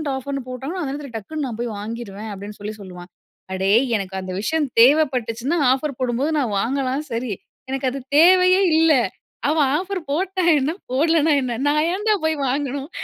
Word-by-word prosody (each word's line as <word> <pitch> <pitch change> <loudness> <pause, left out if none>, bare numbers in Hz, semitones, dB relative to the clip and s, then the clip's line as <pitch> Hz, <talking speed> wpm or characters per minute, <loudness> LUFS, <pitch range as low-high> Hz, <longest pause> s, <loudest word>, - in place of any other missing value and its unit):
ஆஃபர்ன்னு 275 +1 -4
போட்டாங்கன்னா, 275 +9 -5
அந்த 280 - -3
நேரத்தில 280 -3 -7
டக்குனு 280 +7 -4
நான் 230 -3 -6
போய் 235 -3 -3
வாங்கிருவேன் 215 -1 -6
அப்படின்னு 205 +1 -9
சொல்லி 210 +1 -5
சொல்லுவான். 180 -1 -10 0.4
அடேய் 195 +6 +3
எனக்கு 195 -2 -3
அந்த 185 0 -6
விஷயம் 305 +5 0
தேவைப்பட்டுச்சுன்னா 255 0 +3
ஆஃபர் 270 0 -1
போடும்போது 255 +5 0
நான் 235 -7 -1
வாங்கலாம் 265 +4 -1
சரி, 230 0 -2 0.4
எனக்கு 270 0 -1
அது 275 - -5 0.2
தேவையே 365 +3 +6 0.2
இல்ல, 325 -1 +5 0.6
அவ 315 - +1 0.2
ஆஃபர் 380 +1 -3
போட்டா 370 +4 -1 0.2
என்ன, 270 +4 0 0.2
போடலன்னா 320 +2 +3
என்ன, 245 -3 -3
நான் 300 +1 +2
ஏன்டா 420 +2 +1
போய் 315 0 +1
வாங்கணும், 275 +1 -2
270 Hz, 160 wpm, -21 LUFS, 230-315 Hz, 0.6 s, தேவையே